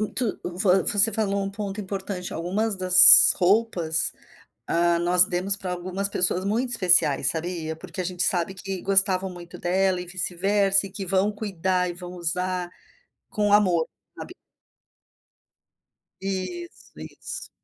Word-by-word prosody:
Muito 215 +1 -1
vo 185 +1 0
você 210 +2 +3
falou 200 -2 -2
um 195 - -4
ponto 200 0 -6
importante. 190 -2 -6
Algumas 195 +5 -3
das 185 -1 +8
roupas, 180 -4 0 0.6
hã, 170 0 +1
nós 175 +1 +4
demos 185 +2 -1
pra 185 -2 -6
algumas 185 +3 -4
pessoas 180 -1 -1
muito 235 +5 -2
especiais, 180 - +3
sabia? 160 0 -5
Porque 185 - -9
a 180 - -3
gente 180 0 -3
sabe 180 +1 -1
que 190 -1 -7
gostavam 195 -1 +1
muito 175 -1 -12
dela 185 +1 -1
e 180 - -8
vice-versa, 195 +2 +1
e - - -12
que 195 0 -7
vão 195 +3 0
cuidar 185 -3 -3
e - - -8
vão 180 0 -10
usar 180 +1 -3 0.6
com 205 -1 -1
amor, 180 -6 +2 0.3
sabe? - - -10 1.9
Isso, 195 - -7
isso. - - -8
185 Hz, 140 wpm, -23 LUFS, 180-200 Hz, 1.9 s, das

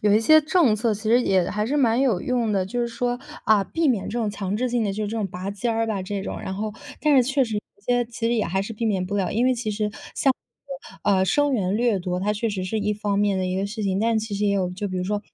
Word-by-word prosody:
有 205 0 +3
一 220 - +4
些 310 +7 +6
政 310 - +3
策 220 0 +1
其 210 - -9
实 230 +3 +4
也 190 -6 +2
还 210 +1 -1
是 280 +5 0
蛮 240 -3 +3
有 235 -10 +2
用 240 -4 0
的， 190 -2 +1
就 240 +6 -3
是 240 - +1
说， 245 +1 -2 0.3
啊， 210 -3 +4
避 325 +6 0
免 230 -7 +1
这 240 - -3
种 220 -3 0
强 200 0 -3
制 255 +2 0
性 240 -2 0
的 200 - -1
就 215 +2 -2
这 - - -5
种 215 -3 -1
拔 185 +1 -5
尖 205 +4 -2
儿 225 0 0
吧 210 -4 -2
这 195 +1 -4
种。 - - -5
然 190 - -4
后 210 +2 -3 0.3
但 300 -2 +4
是 255 - +7
确 270 +2 +1
实 220 -3 -3
一 - - -1 0.2
些 245 0 +2
其 230 0 -4
实 235 - +2
也 220 - +1
还 190 +3 -1
是 210 - -6
避 225 +1 -4
免 195 -4 +1
不 200 +3 -3
了， 195 -2 0
因 230 +4 +1
为 255 - +3
其 230 -3 -3
实， 210 0 -1 0.2
像 270 - +3
这 275 +1 -13
个， 200 -2 +3
啊， 190 - +3
生 290 +9 +2
源 200 -4 0
掠 235 -3 +2
夺， 180 0 -3
它 205 +2 +1
确 215 +2 -1
实 195 -3 -3
是 220 +4 -2
一 210 0 0
方 205 -1 -1
面 205 -1 +2
的 185 - -1
一 185 +1 -2
个 195 - -1
事 215 +2 -5
情。 195 -1 0
但 225 +1 +2
其 215 -1 -4
实 205 - -1
也 200 - +2
有， 185 -2 0
就 195 +3 -4
比 185 - -4
如 180 - -1
说 205 +2 -1
215 Hz, 335 characters per minute, -24 LUFS, 195-240 Hz, 0.3 s, 是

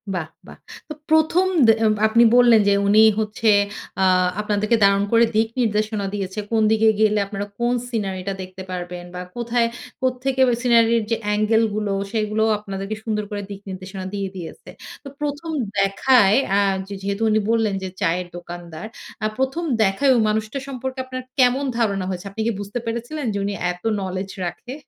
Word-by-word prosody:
বাহ! 170 -4 -3 0.2
বাহ! - - -12 0.3
তো - - -4 0.2
১ম 315 +4 +3 0.2
দে - - +8 0.4
আপনি 230 +2 +4
বললেন 240 -2 +6
যে 200 - +5
উনি 210 +2 +6 0.2
হচ্ছে 215 +1 0 0.5
আ - - +4 0.4
আপনাদেরকে 210 +2 +1
দারুণ 200 0 +4
করে 230 0 +5
দিক 220 +1 +3
নির্দেশনা 215 -2 0
দিয়েছে। 195 0 -4
কোন 225 -1 +2
দিকে 220 0 +3
গেলে 215 -1 +3
আপনারা 200 0 -4
কোন 240 +1 +1 0.2
সিনারিটা 195 -4 -3
দেখতে 185 0 -9
পারবেন, 180 -1 -5
বা 180 - -4
কোথায় 235 0 0 0.3
কোত্থেকে 260 +1 0
ওই 240 - +2
সিনারির 230 -2 +4
যে - - +4
অ্যাঙ্গেল 215 +2 +2
গুলো 210 -2 -1 0.2
সেগুলো 215 -1 0
আপনাদেরকে 195 0 -5
সুন্দর 215 -2 -2
করে 205 -1 -3
দিক 200 -1 -7
নির্দেশনা 190 0 -7
দিয়ে 200 -1 -2
দিয়েছে। 175 -3 -9 0.3
তো - - -9
১ম 295 +3 -3 0.3
দেখায় 195 +2 +4 0.2
আ - - +4 0.3
যে 200 - -7
যেহেতু 200 +2 -3
উনি 215 0 +3
বললেন 225 -3 +1
যে 190 - -3
চায়ের 180 0 0
দোকানদার, 175 +1 -8 0.4
আ - - +1
১ম 265 +6 -1 0.2
দেখায় 205 +8 +2
ওই 235 - +3
মানুষটা 220 +5 -2
সম্পর্কে 260 0 -5
আপনার 255 0 -6 0.2
কেমন 255 +2 +3
ধারণা 200 -5 0
হয়েছে? 185 0 -5
আপনি 220 - -5
কি - - +2
বুঝতে 205 +4 -4
পেরেছিলেন 240 +6 -4
যে - - -2
উনি 200 - -2 0.2
এত 180 0 -11 0.2
নলেজ 190 0 -4 0.2
রাখে? 245 +8 -6
215 Hz, 170 wpm, -21 LUFS, 195-235 Hz, 0.5 s, দে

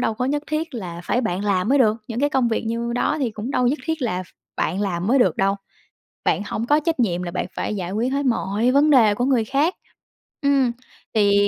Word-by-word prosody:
đâu 225 - 0
có 250 - -2
nhất 290 +2 0
thiết 310 -2 -3
là 175 -6 -6
phải 245 - +1
bạn 200 -3 -2
làm 195 +1 +1
mới 280 +1 +4
được, 220 -3 +4
những 235 +2 -3
cái 290 - +3
công 255 -4 +2
việc 225 - -1
như 235 +1 -2
đó 245 - 0
thì 250 -5 0
cũng 215 +4 -6
đâu 255 - +1
có - - +3
nhất 285 +5 +1
thiết 320 -4 -2
là 185 -6 -1
ph - - -15 0.3
bạn 185 +5 -1
làm 185 -2 -1
mới 265 +4 +4
được 245 - +3
đâu. 195 +1 +1 0.7
Bạn - - +1
hổng 225 - -3
có 295 +1 +4
trách 320 -2 -1
nhiệm 180 -6 +1
là 175 - -4
bạn 185 - -2
phải 215 - -2
giải 185 -2 -4
quyết 235 +5 -1
hết 280 0 0
mọi 230 -1 +1
vấn 290 +3 +4
đề 225 -7 +6
của 245 - 0
người 250 -5 +2
khác. 290 - +1 0.7
Ừm, 275 -3 +3 0.4
thì 205 -1 +4
235 Hz, 250 wpm, -22 LUFS, 205-275 Hz, 0.7 s, đề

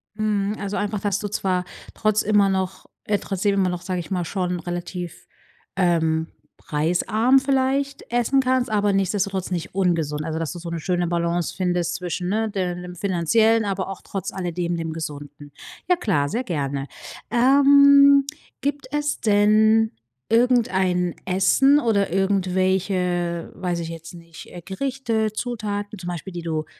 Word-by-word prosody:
Mhm, 210 -1 0
also 200 0 -3
einfach, 205 0 -2
dass 200 0 -1
du 210 - -3
zwar 185 -3 -1 0.3
trotz 215 0 +1
immer 205 -1 +3
noch 190 -1 -2 0.2
äh, 205 - +1
trotzdem 200 +1 -1
immer 190 -2 +2
noch- 180 -1 -4
sag 185 -1 -3
ich 175 - -8
mal- 180 -2 -1
schon 180 0 -2
relativ, 175 0 -6 0.5
ähm, 165 -3 +1 0.3
preisarm 180 - +2
vielleicht 275 +1 0
essen 245 +3 +2
kannst, 255 -2 +1
aber 205 -1 +2
nichtsdestotrotz 195 -1 -1
nicht 175 -3 -4
ungesund. 165 -6 0
Also, 160 -1 -3
dass 165 -2 -3
du 175 - -7
so 170 0 -7
'ne 170 - -3
schöne 175 +1 -1
Balance 170 0 -1
findest 175 -2 -1
zwischen, 180 0 -4
ne, 220 +2 0
de 185 -3 -2
dem 180 0 -8
Finanziellen, 210 +5 +2
aber 195 -1 -2
auch 195 - -7
trotz 195 -3 -5
alledem, 175 -2 -2
dem 165 -1 -3
Gesunden. 145 -2 -8 0.4
Ja 360 - +5
klar, 190 - 0
sehr 240 - -2
gerne. 140 - -3 0.4
Ähm, 280 +2 +6 0.4
gibt 285 -1 -2
es 295 0 -1
denn 215 +1 +4 0.4
irgendein 190 -8 +2
Essen 195 +10 +4
oder 210 - +1
irgendwelche- 185 -2 0
weiß 175 -2 -2
ich 165 -1 -5
jetzt 165 +1 -9
nicht- 170 -1 -12
äh, 175 - -8
Gerichte, 225 - -2
Zutaten 210 -3 -4
zum 180 -2 -6
Beispiel, 175 +2 -6
die 175 - -5
du 160 -2 -2
190 Hz, 155 wpm, -23 LUFS, 175-220 Hz, 0.5 s, Ähm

